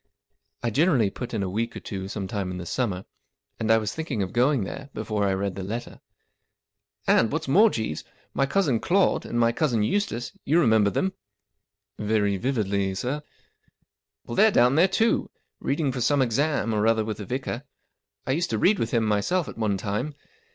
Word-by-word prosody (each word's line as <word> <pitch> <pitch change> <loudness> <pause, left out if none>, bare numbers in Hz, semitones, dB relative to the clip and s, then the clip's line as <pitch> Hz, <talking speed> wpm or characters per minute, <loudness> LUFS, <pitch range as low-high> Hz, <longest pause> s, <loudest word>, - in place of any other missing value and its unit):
I 120 - 0
generally 135 - +3
put 125 - -6
in 110 -4 -1
a - - -1
week 115 +5 -2
or - - -4
two 95 -2 -6
some 100 -1 -4
time 100 -2 -3
in 90 - -5
the 90 - -6
summer, 95 -2 -2 0.5
and 110 - -1
I 115 - +6
was 110 -2 -2
thinking 150 -10 -2
of 95 - -6
going 125 0 +3
there 135 +8 -7
before 105 -1 -1
I 95 -1 +1
read 100 0 -2
the 95 - -6
letter. 110 +6 -6 0.5
" - - -51
And, 115 - +4
what's 155 0 -2
more, 205 +11 +6
Jeeves, 110 - -3 0.3
my 135 - +1
cousin 140 -8 +2
Claude, 190 - +2
and 120 - -1
my 115 0 +4
cousin 120 -5 +1
Eustace 120 - -1
—you 160 +4 +3
re¬ 160 - +4
member 110 -2 +4
them? 190 - -1 0.3
" - - -57
" - - -36
Very 105 -2 +1
vividly, 100 -5 0
sir/'. 130 +9 -2 0.5
" - - -51
Well, - - -6
they're 220 - +6
down 125 - +4
there, 165 +6 +5
too, 225 +4 +1 0.3
reading 140 0 0
for 125 -1 -4
some 135 +3 +3
exam, 130 0 0
or 105 +1 +2
other 110 -1 +2
with 110 -1 -4
the 105 - -6
vicar. 125 +2 -3 0.6
I 130 - -1
used 165 +5 0
to 110 - 0
read 200 - +3
with 115 - 0
him 115 -2 +1
myself 130 - +1
at - - -7
one 105 -3 +1
time. 105 +9 -3
115 Hz, 205 wpm, -25 LUFS, 105-140 Hz, 0.6 s, I